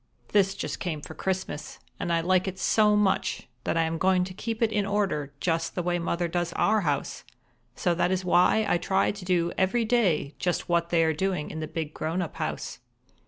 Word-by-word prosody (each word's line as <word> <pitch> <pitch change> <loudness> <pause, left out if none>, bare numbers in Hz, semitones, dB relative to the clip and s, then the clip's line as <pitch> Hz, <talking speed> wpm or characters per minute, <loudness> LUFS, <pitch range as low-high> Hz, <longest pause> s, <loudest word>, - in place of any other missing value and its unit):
This 195 -1 +3
just - - -4
came 165 -5 -3
for 160 - -9
Christmas, 185 -5 -3 0.2
and 175 -3 -2
I 165 0 +2
like 185 +2 +2
it 190 0 -4
so 210 +2 +3
much 210 -2 +1 0.2
that - - 0
I 165 - +3
am 165 0 -2
going 185 0 +3
to 185 0 -6
keep 225 +4 -3
it 220 - +2
in 210 -1 +1
order 195 -8 -1
just 165 0 -1
the 180 - -1
way 175 0 0
Mother 170 +1 -1
does 175 0 -2
our 215 0 +2
house, 145 -5 -2 0.5
so 175 +4 +1
that 175 +1 +1
is 185 0 -1
why 180 +5 +4
I 175 - +2
try 190 +2 +1
to 205 -2 -9
do 175 -2 +1
every 210 +5 +2
day 185 -12 +2
just 175 -1 -1
what 170 -1 +1
they 170 -1 +3
are 160 0 +2
doing 180 -1 -2
in 160 - -5
the 155 - -3
big 155 -1 -4
grown 165 +3 -2
up 165 - -8
house. - - -4
180 Hz, 215 wpm, -27 LUFS, 165-195 Hz, 0.5 s, why